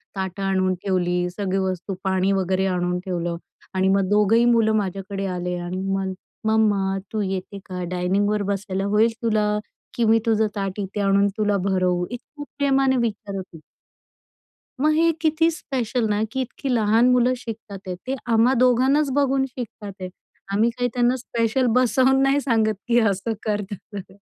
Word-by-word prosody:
ताटं 190 0 -4
आणून 190 -1 +1
ठेवली, 180 -2 0
सगळी 195 +1 -2
वस्तू 190 0 -2
पाणी 190 0 +1
वगैरे 190 0 +1
आणून 180 -1 -1
ठेवलं 175 -2 -2 0.4
आणि 190 0 +1
मग 195 -1 +1
2घंही 210 +3 +4
मुलं 225 -2 +3
माझ्याकडे 195 0 -3
आले 180 0 -3
आणि 175 +2 -4
मग, 195 0 -1 0.3
"मम्मा 205 -3 +2 0.2
तू 215 - 0
येते 195 0 -4
का 180 -1 -5
डायनिंगवर 200 +3 +1
बसायला 195 -1 -3
होईल 215 +3 +3
तुला? 210 -2 +1 0.4
की 235 - 0
मी 225 +1 +5
तुझं 220 -1 +2
ताट 195 0 -3
इथे 200 +1 -3
आणून 200 0 +3
तुला 205 -1 +1
भरवू?" 185 -2 +1
इतक 275 +5 -8 0.2
प्रेमाने 270 -1 +3
विचारत 205 -4 -2
होती. 165 - -10 1.2
मग 305 +1 +4
हे 330 +1 +4
किती 320 +1 +3
स्पेशल 250 -6 -2
ना 210 +1 +1
की 265 - -1
इतकी 260 +2 -5
लहान 225 +2 +4
मुलं 250 0 +3
शिकत 225 -3 -8 0.2
आहेत. 190 +9 -4
आम्हा 230 +2 +4
दोघांनाच 265 +4 +3
बघून 270 -1 +2
शिकत 245 -3 -8 0.2
आहेत. 185 - -4 0.4
आम्ही 220 +4 +3
काही 245 +1 -1
त्यांना 245 +1 +2
स्पेशल 235 0 0
बसवून 260 +1 +3
नाही 275 +1 +3
सांगत 225 -5 +2
की 240 0 +4
असं 210 0 0
कर, 210 -1 0
तसं 205 +1 -7
कर. 190 0 -13
210 Hz, 160 wpm, -23 LUFS, 190-240 Hz, 1.2 s, मी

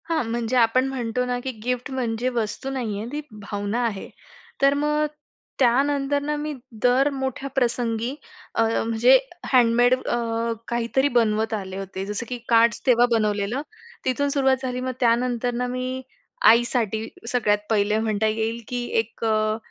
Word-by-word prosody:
हां, 325 -3 +1
म्हणजे 235 +1 -1
आपण 245 +3 +4
म्हणतो 250 -2 -2
ना 250 0 -1
की 265 - -2
गिफ्ट 250 +1 -2
म्हणजे 245 -1 -1
वस्तू 225 +4 -2
नाही 235 -7 -3
आहे, 225 - -5
ती 295 +1 -3 0.2
भावना 205 +2 -3
आहे. 205 -4 -4 0.5
तर 275 0 +5
मग 300 +1 +1 0.5
त्यानंतर 275 +3 +2
ना 300 +1 -1
मी 300 +1 -3 0.3
दर 255 +3 +4
मोठ्या 265 0 -3
प्रसंगी 240 -1 0 0.4
अ, - - +3
म्हणजे 230 +3 +4 0.4
हँडमेड 245 0 +5
अ, 230 -2 -2
काहीतरी 240 +3 +1
बनवत 220 -1 +2
आले 190 -3 -4
होते. 195 0 -5
जसं 210 +3 -4
की 250 - -3
कार्ड्स 230 0 +4
तेव्हा 245 -2 +5
बनवलेलं. 215 +2 +1 0.4
तिथून 280 +3 +1
सुरुवात 270 -2 +2
झाली, 250 -1 -2
मग 255 0 -2
त्यानंतर 245 0 +1
ना 250 +1 -1
मी 255 +1 -3 0.5
आईसाठी 230 -2 +2 0.2
सगळ्यात 220 -5 +2
पहिले 210 -1 +2
म्हणता 220 -1 0
येईल 225 +2 -1
की 245 -1 -3 0.2
एक 225 +1 -4
अ, 215 0 +1
240 Hz, 150 wpm, -24 LUFS, 225-260 Hz, 0.5 s, तर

